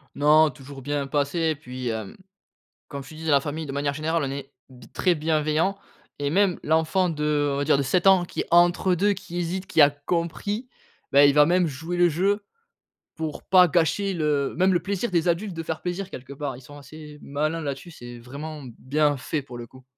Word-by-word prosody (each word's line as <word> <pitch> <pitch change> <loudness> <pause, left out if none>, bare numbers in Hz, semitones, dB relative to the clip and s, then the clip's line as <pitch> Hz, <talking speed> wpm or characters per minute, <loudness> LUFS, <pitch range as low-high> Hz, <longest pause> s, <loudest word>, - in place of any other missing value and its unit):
Non, 150 +2 +5
toujours 135 -1 -11
bien 145 0 -2
passé 145 +4 -1
et 160 -1 +1
puis, 125 -3 -6
hem, 110 -3 -5 0.7
comme 140 -1 -6
je 135 - -13
te 155 - -11
disais, 160 0 -4
la 140 -1 +5
famille 155 +2 -5
de 135 - -6
manière 140 0 -1
générale, 160 +2 -1
on 135 - -3
est 140 0 -7 0.2
b 125 -1 -15
très 180 -2 +2
bienveillants 155 +4 0 0.4
et 145 0 -1
même 190 0 +2
l'enfant 160 +4 +2
de, 150 -2 0
on - - -2
va 145 - -1
dire, 145 -2 +3
de - - +1
7 180 +7 0
ans 190 -2 +6
qui - - -5
est - - -3
entre 175 +2 +4
2, 200 +4 +2
qui 175 -2 -7
hésite, 180 +2 -3
qui 160 - +1
a 145 0 +8
compris, 170 - -3 0.4
bah, 140 +1 +7
il 140 0 +5
va 150 0 +6
même 180 +1 +3
jouer 160 +5 -5
le 175 0 +5
jeu 200 +6 0 0.7
pour 160 -2 -5
pas 180 -1 +6
gâcher 180 +4 +1
le 150 -4 0
même 185 +1 +3
le 175 - +3
plaisir 200 +3 -2
des 170 -1 +1
adultes, 185 +4 0
de 165 - -4
faire 160 0 -4
plaisir 180 +2 -4
quelque 130 -2 -9
part. 140 -3 -5
Ils - - -13
sont 145 +3 -13
assez 150 +1 -12
malins 155 +3 -2
là-dessus, 140 +4 -5
c'est 120 -5 -10
vraiment 145 +5 -8 0.2
bien 145 +1 +1
fait, 150 +3 -3
pour 125 -3 -10
le 120 -1 -8
coup. 130 +1 -17
155 Hz, 220 wpm, -24 LUFS, 140-175 Hz, 0.7 s, a